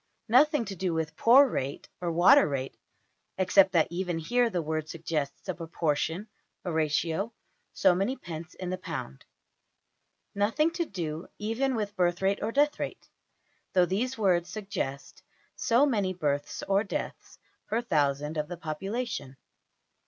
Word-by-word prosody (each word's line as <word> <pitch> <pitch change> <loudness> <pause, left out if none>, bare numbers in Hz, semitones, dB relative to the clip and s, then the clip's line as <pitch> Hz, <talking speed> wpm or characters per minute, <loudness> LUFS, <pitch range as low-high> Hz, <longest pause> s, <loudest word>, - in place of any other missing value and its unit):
Nothing 275 +1 +5
to 195 - -6
do 180 -2 -1
with 160 0 -2
poor 265 +5 +7
rate, 140 - -4
or 175 -1 -1
water 180 - +6
rate 135 -1 -3 0.6
(except 190 +1 +5
that 165 -3 +5
even 175 -1 -2
here 240 +9 +2
the 180 - -1
word 155 0 -3
suggests 155 -3 -4
a 185 - -1
proportion 165 +3 -2 0.4
a 180 - -1
ratio 160 +6 0 0.4
so - - +4
many 195 +9 0
pence 170 -4 -8
in 185 -1 -5
the 185 - -3
pound). 65 - -6 1.1
Nothing 225 +11 +2
to 340 0 -2
do 165 - -5
even 235 +5 -1
with 210 -2 -3
birth 175 -2 +1
rate 195 +1 +1
or - - -1
death 290 +3 +2
rate, - - -5 0.6
though 180 -1 +5
these 230 +8 -1
words 180 -5 +2
suggest 195 -10 -5 0.3
so 240 +5 +3
many 205 -9 0
births 145 -4 -2
or 195 +1 +3
deaths 200 - -5 0.3
per 225 - 0
thousand 150 - 0
of 150 0 -1
the 175 - -6
population. 165 - -4
185 Hz, 150 wpm, -28 LUFS, 160-220 Hz, 1.1 s, poor